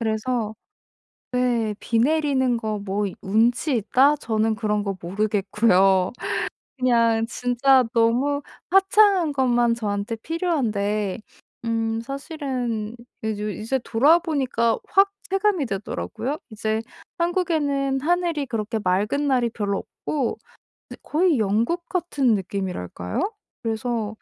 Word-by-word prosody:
그래서 220 Hz, 0 st, -1 dB, 0.8 s
네 240 Hz, -4 st, +1 dB
'비 230 Hz, -, 0 dB
내리는 265 Hz, -2 st, +2 dB
거 215 Hz, -2 st, -3 dB
뭐 200 Hz, +1 st, -2 dB, 0.2 s
운치 235 Hz, +7 st, +2 dB
있다?' 260 Hz, +7 st, +4 dB
저는 220 Hz, -5 st, 0 dB
그런 210 Hz, -1 st, -1 dB
거 195 Hz, -2 st, -3 dB
모르겠고요. 195 Hz, 0 st, +2 dB, 0.6 s
그냥 230 Hz, -3 st, +3 dB
진짜 250 Hz, +2 st, +3 dB
너무 250 Hz, +5 st, +2 dB, 0.3 s
화창한 390 Hz, -3 st, +4 dB
것만 240 Hz, -3 st, +2 dB
저한테 205 Hz, -1 st, -2 dB
필요한데 220 Hz, -, -1 dB, 0.5 s
음 225 Hz, -1 st, -1 dB
사실은 255 Hz, -5 st, -4 dB, 0.3 s
이제, 210 Hz, -1 st, -2 dB
이제 235 Hz, +5 st, -2 dB
돌아와 290 Hz, +11 st, +4 dB
보니까 260 Hz, -8 st, 0 dB
확 395 Hz, +1 st, +4 dB, 0.2 s
체감이 390 Hz, -5 st, +1 dB
되더라고요. 200 Hz, -, -4 dB
이제 220 Hz, 0 st, -1 dB, 0.4 s
한국에는 300 Hz, -6 st, 0 dB
하늘이 335 Hz, -2 st, 0 dB
그렇게 225 Hz, -1 st, -2 dB
맑은 210 Hz, +9 st, 0 dB
날이 255 Hz, -4 st, +2 dB
별로 200 Hz, -3 st, -2 dB, 0.3 s
없고 275 Hz, -6 st, -1 dB, 0.5 s
그 -, -, -8 dB
거의 320 Hz, -3 st, +2 dB
영국 230 Hz, -, 0 dB, 0.4 s
같은 240 Hz, -4 st, +5 dB
느낌이랄까요? 185 Hz, -, -3 dB, 0.3 s
그래서 225 Hz, -1 st, -2 dB
235 Hz, 250 characters per minute, -23 LUFS, 215-280 Hz, 0.8 s, 같은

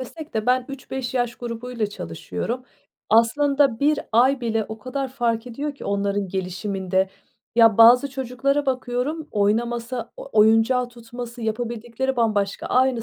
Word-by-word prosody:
desek 305 Hz, +3 st, -9 dB
de 220 Hz, +1 st, -1 dB
ben 255 Hz, 0 st, +3 dB
3-5 265 Hz, -2 st, -5 dB
yaş 245 Hz, -1 st, 0 dB
grubuyla 235 Hz, -1 st, -4 dB
çalışıyorum. 205 Hz, -, -5 dB, 0.5 s
Aslında 275 Hz, +2 st, +3 dB
1 295 Hz, +1 st, +3 dB
ay 255 Hz, +3 st, +4 dB
bile 225 Hz, -2 st, 0 dB
o 220 Hz, 0 st, -7 dB
kadar 265 Hz, +3 st, -4 dB
fark 240 Hz, -2 st, -1 dB
ediyor 280 Hz, +4 st, -4 dB
ki -, -, -11 dB
onların 200 Hz, -1 st, -1 dB
gelişiminde. 190 Hz, 0 st, -1 dB, 0.5 s
Ya, 225 Hz, -2 st, +6 dB
bazı 250 Hz, +4 st, +7 dB
çocuklara 270 Hz, +2 st, -1 dB
bakıyorum; 260 Hz, +4 st, -2 dB
oynaması, 235 Hz, +4 st, -1 dB
o -, -, -9 dB
oyuncağı 225 Hz, +4 st, +4 dB
tutması, 240 Hz, 0 st, -9 dB
yapabildikleri 240 Hz, +3 st, -2 dB
bambaşka. 210 Hz, -4 st, 0 dB
Aynı 255 Hz, -2 st, +2 dB
240 Hz, 135 wpm, -23 LUFS, 220-260 Hz, 0.5 s, bazı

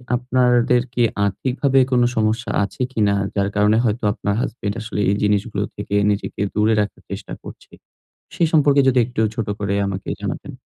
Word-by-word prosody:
আপনাদের 125 Hz, -1 st, +2 dB
কি 120 Hz, -, +2 dB, 0.2 s
আর্থিকভাবে 130 Hz, +7 st, +1 dB
কোন 125 Hz, -1 st, +3 dB
সমস্যা 110 Hz, +2 st, 0 dB
আছে 100 Hz, -, -6 dB
কিনা? 105 Hz, -5 st, +1 dB, 0.2 s
যার 100 Hz, 0 st, +1 dB
কারণে 105 Hz, +1 st, +3 dB
হয়তো 110 Hz, +2 st, -1 dB
আপনার 100 Hz, -1 st, -2 dB
হাসব্যান্ড 110 Hz, -6 st, -3 dB
আসলে 110 Hz, -1 st, -5 dB
এই 100 Hz, -, +2 dB
জিনিসগুলো 105 Hz, 0 st, 0 dB
থেকে 100 Hz, 0 st, -4 dB, 0.2 s
নিজেকে 100 Hz, 0 st, -4 dB
দূরে 110 Hz, +1 st, +3 dB
রাখার 105 Hz, -, -5 dB
চেষ্টা -, -, -6 dB
করছে? -, -, -12 dB, 0.6 s
সে -, -, -2 dB
সম্পর্কে 145 Hz, -3 st, +4 dB
যদি 130 Hz, -1 st, +3 dB
একটু 120 Hz, -2 st, -4 dB
ছোট 115 Hz, -3 st, -3 dB
করে 100 Hz, -1 st, -1 dB
আমাকে 100 Hz, 0 st, -5 dB
জানাতেন? -, -, -5 dB
110 Hz, 165 wpm, -20 LUFS, 100-125 Hz, 0.6 s, সম্পর্কে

